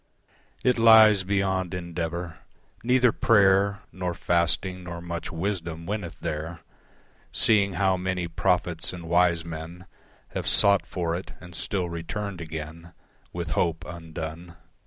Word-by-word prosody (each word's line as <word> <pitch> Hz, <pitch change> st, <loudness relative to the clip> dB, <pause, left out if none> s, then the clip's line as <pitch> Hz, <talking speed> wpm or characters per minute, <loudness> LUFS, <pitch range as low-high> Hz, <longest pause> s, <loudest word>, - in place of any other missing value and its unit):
It 125 Hz, -2 st, +2 dB
lies 110 Hz, -3 st, +7 dB
beyond 95 Hz, -2 st, -1 dB
endeavour; 85 Hz, -1 st, -5 dB, 0.4 s
neither 125 Hz, 0 st, +4 dB
prayer 100 Hz, -2 st, +3 dB
Nor 90 Hz, -2 st, -4 dB
fasting, 85 Hz, +2 st, +1 dB
nor 85 Hz, -1 st, -6 dB
much 85 Hz, -1 st, -5 dB
wisdom 85 Hz, -2 st, -3 dB
winneth 100 Hz, -2 st, -4 dB
there, 80 Hz, +2 st, -4 dB, 0.7 s
Seeing 100 Hz, -3 st, +3 dB
how 95 Hz, +1 st, +1 dB
many 90 Hz, -1 st, -2 dB
prophets 85 Hz, 0 st, 0 dB
and 85 Hz, -2 st, -8 dB
wise 85 Hz, -1 st, +2 dB
men 85 Hz, +2 st, -8 dB, 0.4 s
Have -, -, -4 dB
sought 100 Hz, -1 st, +5 dB
for 85 Hz, -3 st, -2 dB
it 90 Hz, +3 st, -6 dB
and 90 Hz, -1 st, -12 dB
still 90 Hz, +2 st, -1 dB
returned 85 Hz, +3 st, -5 dB
again 80 Hz, +1 st, -8 dB, 0.4 s
With 85 Hz, -3 st, -5 dB
hope 80 Hz, +1 st, 0 dB
undone. 85 Hz, 0 st, -8 dB
85 Hz, 125 wpm, -26 LUFS, 85-95 Hz, 0.7 s, lies